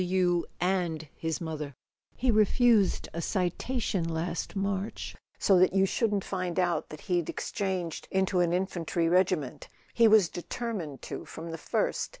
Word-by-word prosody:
"You 180 -1 +1
and 175 -4 0
his 160 -1 -2
mother: 155 -4 -5 0.4
he 255 0 +2
refused 215 -1 +4
a 170 - -3
citation 190 +3 -1
last 165 +3 -3
March 195 +1 -2 0.2
so 190 -3 +4
that 185 0 +4
you 195 0 +4
shouldn't 205 -1 0
find 185 -2 -3
out 175 -2 +1
that 155 - -9
he'd 175 -3 0
ex¬ - - -5
changed 185 -4 -2
into 190 -1 +1
an 175 -1 +3
infantry 175 -2 0
regiment. 175 -6 +1 0.3
He 230 -1 +6
was 215 -4 +6
determined 175 - -5
to - - -5
from 165 +1 -7
the 165 - -6
first. - - -1
180 Hz, 150 wpm, -29 LUFS, 165-195 Hz, 0.4 s, He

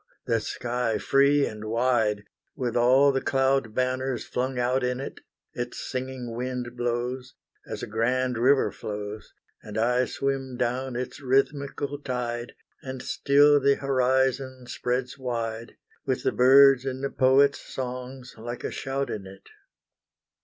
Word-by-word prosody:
the 115 -1 +1
sky 120 0 -2
free 140 +7 +3
and 110 0 -6
wide, 110 -2 +1 0.3
With 125 -4 -2
all 130 +4 +5
the 135 -1 -1
cloud 135 -4 +1
banners 130 0 -1
flung 130 +1 -2
out 125 +1 +1
in 125 0 -1
it 135 - -7 0.3
Its 120 0 -5
singing 130 -2 -5
wind 125 0 -4
blows 125 +2 -3 0.3
As - - -6
a - - -1
grand 125 +3 0
river 135 +3 +4
flows, 105 0 -6 0.3
And 105 0 -8
I 125 +3 +2
swim 135 -1 -3
down 125 +1 -1
its 125 +1 -4
rhythmical 140 +2 0
tide, 120 -3 -4 0.3
And 130 -1 -7
still 145 +1 +4
the 140 0 +3
horizon 130 -1 0
spreads 125 +2 -3
wide, 115 -2 -4 0.3
With - - -2
the - - +2
birds' 135 +1 +6
and 130 0 -4
the 140 - -1
poets' 140 +2 +4
songs 125 0 -6
like 120 +2 -6
a - - -3
shout 135 -1 -3
in 100 -2 -5
it! 95 0 -14
125 Hz, 140 wpm, -26 LUFS, 120-135 Hz, 0.3 s, birds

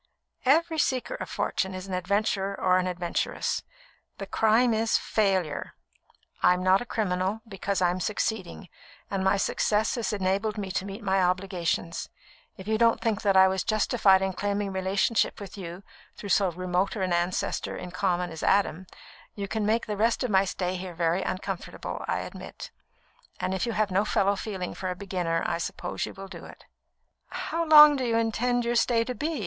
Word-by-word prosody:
"Every 320 +3 +3
seeker 260 - 0
of - - -6
fortune 190 -1 -2
is 185 0 -6
an 190 - -6
adventurer 195 +1 0
or 185 0 +3
an 185 - -1
adventuress. 175 -1 -2 0.6
The - - -5
crime 225 +2 +3
is, 220 +1 +2
failure. 190 -8 -1 0.7
I'm 180 0 +4
not 185 +2 +4
a 245 - -6
criminal, 195 0 -1
because 195 -2 -2
I 175 - +4
am 180 - -3
succeeding, 200 -1 -3 0.4
and 195 -1 -1
my 190 +1 +3
success 210 +2 +1
has 235 -3 -2
enabled 200 +2 -1
me 195 -2 -4
to 190 - -2
meet 200 +3 -7
my 190 -1 +2
obligations. 180 -2 -1 0.5
If 190 - -10
you 220 0 +1
don't 230 -1 +4
think 220 -2 -1
that 195 -2 +3
I 190 0 +8
was 190 0 0
justified 210 -3 +3
in 190 0 -1
claiming 200 +1 -2
relationship 190 +4 +1
with 200 -2 -9
you 180 -1 -8 0.3
through 205 - -8
so 195 +1 +3
remote 180 +2 -1
an 185 -4 -1
ancestor 175 +1 -1
in 180 - -7
common 180 -1 -1
as 160 - -7
Adam, 190 -2 +1 0.5
you 200 -1 -4
can 215 0 -1
make 225 +2 +1
the 210 -2 -4
rest 230 +4 +2
of 250 - -1
my 190 0 +4
stay 180 0 -2
here 180 -1 -7
very 170 +2 +1
uncomfortable, 190 0 -5
I - - -1
admit; - - -9 0.7
and 185 - -1
if 190 +5 -1
you 230 - -1
have 210 -2 0
no 190 +2 +2
fellow 200 -1 +2
feeling 195 -3 -5
for 185 - -4
a 180 - -3
beginner, 180 -4 -2
I 170 - -1
suppose 175 +1 -4
you - - -9
will 195 0 -8
do 190 - -10
it." - - -14 0.6
"How 335 +1 -3
long 300 -1 +9
do 265 - -2
you 230 -2 +1
intend 240 +2 0
your 235 - +1
stay 235 -1 +3
to 250 - -4
be?" 305 +3 -3
195 Hz, 185 wpm, -27 LUFS, 185-220 Hz, 0.7 s, long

